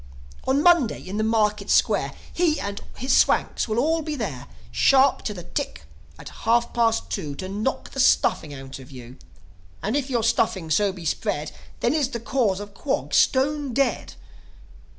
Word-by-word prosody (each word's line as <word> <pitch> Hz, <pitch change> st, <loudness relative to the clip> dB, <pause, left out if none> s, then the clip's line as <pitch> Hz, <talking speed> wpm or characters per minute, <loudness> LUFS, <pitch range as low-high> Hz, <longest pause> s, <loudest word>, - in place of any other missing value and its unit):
"On 275 Hz, +3 st, +2 dB
Monday, 340 Hz, -10 st, +4 dB
in 195 Hz, +3 st, -4 dB
the 215 Hz, -, +1 dB
Market 210 Hz, -2 st, +1 dB
Square, -, -, +2 dB, 0.2 s
He 335 Hz, -3 st, +1 dB
and 200 Hz, 0 st, -4 dB, 0.2 s
his 260 Hz, +3 st, +1 dB
Swanks -, -, +2 dB
will 220 Hz, 0 st, -2 dB
all 320 Hz, +6 st, +2 dB
be 305 Hz, -1 st, -4 dB
there, 195 Hz, -, -5 dB, 0.2 s
Sharp 265 Hz, -, +4 dB
to -, -, -1 dB
the 175 Hz, -, -8 dB
tick -, -, -4 dB, 0.3 s
at -, -, -10 dB, 0.2 s
half 235 Hz, 0 st, +3 dB
past 230 Hz, -1 st, +1 dB
two, 150 Hz, -8 st, -3 dB
To 185 Hz, -, -6 dB
knock 210 Hz, +7 st, -3 dB
the 270 Hz, -, -6 dB
stuffing 160 Hz, -, +3 dB
out 135 Hz, -1 st, -9 dB
of 130 Hz, -, -13 dB
you. 125 Hz, -1 st, -11 dB, 0.7 s
And 215 Hz, +6 st, -1 dB
if 285 Hz, -1 st, -1 dB
your 240 Hz, -3 st, 0 dB
stuffing 205 Hz, -7 st, +1 dB
so 200 Hz, +5 st, +3 dB
be 180 Hz, -3 st, -10 dB
spread, 150 Hz, -1 st, -2 dB, 0.3 s
Then 240 Hz, -, +2 dB
is 295 Hz, -4 st, +1 dB
the 235 Hz, -, -4 dB
Cause 225 Hz, -5 st, 0 dB
of 205 Hz, 0 st, -9 dB
Quog 270 Hz, +7 st, -3 dB
stone 280 Hz, 0 st, +2 dB
dead. 275 Hz, -1 st, 0 dB
225 Hz, 175 wpm, -24 LUFS, 190-270 Hz, 0.7 s, Monday